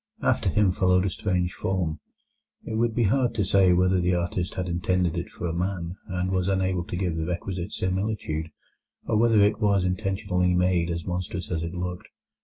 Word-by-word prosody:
After -, -, +2 dB
him 100 Hz, +1 st, +3 dB
followed 90 Hz, 0 st, +2 dB
a 95 Hz, -, 0 dB
strange 90 Hz, -2 st, -1 dB
form; 90 Hz, -5 st, -2 dB, 0.7 s
it -, -, -5 dB
would 115 Hz, 0 st, +1 dB
be 120 Hz, -, +2 dB
hard 120 Hz, +4 st, +2 dB
to 105 Hz, -, +1 dB
say 95 Hz, -1 st, +4 dB
whether 90 Hz, +1 st, +3 dB
the 90 Hz, +1 st, +2 dB
artist 85 Hz, 0 st, -2 dB
had 90 Hz, -1 st, -2 dB
intended 90 Hz, 0 st, 0 dB
it 85 Hz, -, -3 dB
for -, -, -7 dB
a 85 Hz, -, -1 dB
man, 90 Hz, -1 st, -2 dB
and 90 Hz, 0 st, -2 dB
was 95 Hz, -1 st, 0 dB
unable 95 Hz, -2 st, +1 dB
to -, -, -5 dB
give 90 Hz, -3 st, -1 dB
the 80 Hz, 0 st, -2 dB
requisite 90 Hz, 0 st, -3 dB
similitude, 95 Hz, -5 st, -2 dB, 0.6 s
or -, -, 0 dB
whether 115 Hz, -1 st, +4 dB
it 105 Hz, +1 st, +3 dB
was 100 Hz, -3 st, +2 dB
intentionally 90 Hz, -1 st, 0 dB
made 90 Hz, -1 st, +2 dB
as 85 Hz, -1 st, -3 dB
monstrous 90 Hz, 0 st, -4 dB
as 80 Hz, -2 st, -1 dB
it 85 Hz, +1 st, -4 dB
looked. 90 Hz, +3 st, -4 dB
90 Hz, 195 wpm, -26 LUFS, 90-95 Hz, 0.7 s, say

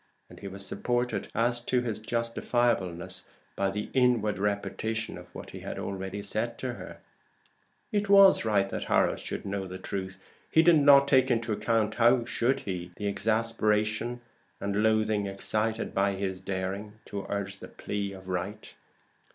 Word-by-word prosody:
And -, -, -12 dB
he 100 Hz, -, -7 dB
was 100 Hz, +1 st, -6 dB
supported 120 Hz, +4 st, -1 dB
as 120 Hz, +1 st, +2 dB
to 125 Hz, -1 st, +2 dB
his 115 Hz, -3 st, -3 dB
justifiableness 110 Hz, -6 st, -1 dB, 0.3 s
by 100 Hz, 0 st, +1 dB
the 105 Hz, +2 st, -4 dB
inward 120 Hz, -6 st, +2 dB
repetition 105 Hz, +2 st, -2 dB
of 90 Hz, 0 st, -10 dB
what 85 Hz, -, -10 dB
he -, -, -8 dB
had -, -, -6 dB
already 95 Hz, +1 st, -4 dB
said 110 Hz, +3 st, -2 dB
to 130 Hz, -2 st, -3 dB
her; -, -, -9 dB, 0.9 s
it 205 Hz, -1 st, 0 dB
was 195 Hz, -1 st, +7 dB
right 105 Hz, -3 st, +2 dB
that -, -, -4 dB
Harold -, -, +2 dB
should -, -, -5 dB
know 100 Hz, -1 st, -3 dB
the 95 Hz, 0 st, -7 dB
truth. 95 Hz, 0 st, -5 dB, 0.3 s
He 160 Hz, -, +5 dB
did 165 Hz, -2 st, +6 dB
not 140 Hz, -1 st, +7 dB
take 130 Hz, -1 st, +4 dB
into 115 Hz, -2 st, +1 dB
account 110 Hz, 0 st, +1 dB
(how 120 Hz, +1 st, +5 dB
should 120 Hz, +2 st, 0 dB
he?) 90 Hz, -2 st, -4 dB
the 105 Hz, -, -5 dB
exasperation 110 Hz, +2 st, 0 dB, 0.4 s
and 100 Hz, +1 st, -1 dB
loathing 110 Hz, -2 st, +2 dB
excited 110 Hz, +3 st, -1 dB
by 100 Hz, 0 st, +2 dB
his 95 Hz, -1 st, -3 dB
daring 95 Hz, +2 st, -4 dB
to 100 Hz, -1 st, -6 dB
urge 100 Hz, -1 st, -3 dB
the -, -, -9 dB
plea 100 Hz, -1 st, -4 dB
of 95 Hz, -1 st, -11 dB
right. 95 Hz, +4 st, -4 dB
105 Hz, 160 wpm, -28 LUFS, 100-120 Hz, 0.9 s, was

